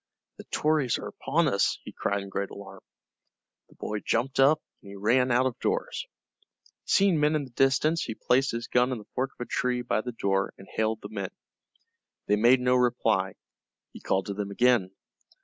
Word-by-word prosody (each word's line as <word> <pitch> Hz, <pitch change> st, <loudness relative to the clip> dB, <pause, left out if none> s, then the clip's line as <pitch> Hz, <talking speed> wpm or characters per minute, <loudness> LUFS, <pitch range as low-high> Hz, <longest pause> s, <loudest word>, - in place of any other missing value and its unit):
"The -, -, -11 dB
Tories 150 Hz, -5 st, +1 dB
are -, -, -7 dB
upon 165 Hz, +2 st, 0 dB
us!" 100 Hz, -8 st, +1 dB
he -, -, -8 dB
cried 100 Hz, 0 st, -2 dB
in 100 Hz, -, -9 dB
great 100 Hz, 0 st, -3 dB
alarm. 95 Hz, -1 st, -11 dB, 0.9 s
The -, -, -21 dB
boy 105 Hz, 0 st, -4 dB
jumped 125 Hz, +6 st, -1 dB
up, 145 Hz, +3 st, +5 dB, 0.2 s
and 100 Hz, -1 st, -11 dB
ran 125 Hz, +5 st, +3 dB
out 125 Hz, +1 st, +3 dB
of 130 Hz, -3 st, -2 dB
doors. 475 Hz, +1 st, -2 dB, 0.8 s
Seeing 195 Hz, -5 st, +3 dB
men 150 Hz, +1 st, +3 dB
in 150 Hz, -, 0 dB
the 130 Hz, -, -11 dB
distance 135 Hz, +6 st, +2 dB
he 110 Hz, -, -5 dB
placed 130 Hz, +4 st, +2 dB
his 115 Hz, 0 st, -3 dB
gun 125 Hz, +1 st, +2 dB
in 125 Hz, -, -2 dB
the 105 Hz, -, -11 dB
fork 130 Hz, +1 st, -1 dB
of -, -, -4 dB
a -, -, -9 dB
tree 125 Hz, -1 st, -1 dB
by 115 Hz, -, 0 dB
the 125 Hz, -, -5 dB
door, 95 Hz, -3 st, -1 dB
and 95 Hz, -, -14 dB
hailed 110 Hz, 0 st, 0 dB
the 100 Hz, -, -7 dB
men. 100 Hz, -3 st, -4 dB, 1.0 s
They 105 Hz, -, +3 dB
made 120 Hz, +4 st, +5 dB
no 125 Hz, 0 st, +3 dB
reply. 110 Hz, -6 st, +1 dB, 0.6 s
He -, -, -10 dB
called 95 Hz, -1 st, 0 dB
to 100 Hz, -, -4 dB
them 100 Hz, 0 st, -4 dB
again. 120 Hz, -2 st, +3 dB
120 Hz, 195 wpm, -27 LUFS, 100-135 Hz, 1.0 s, up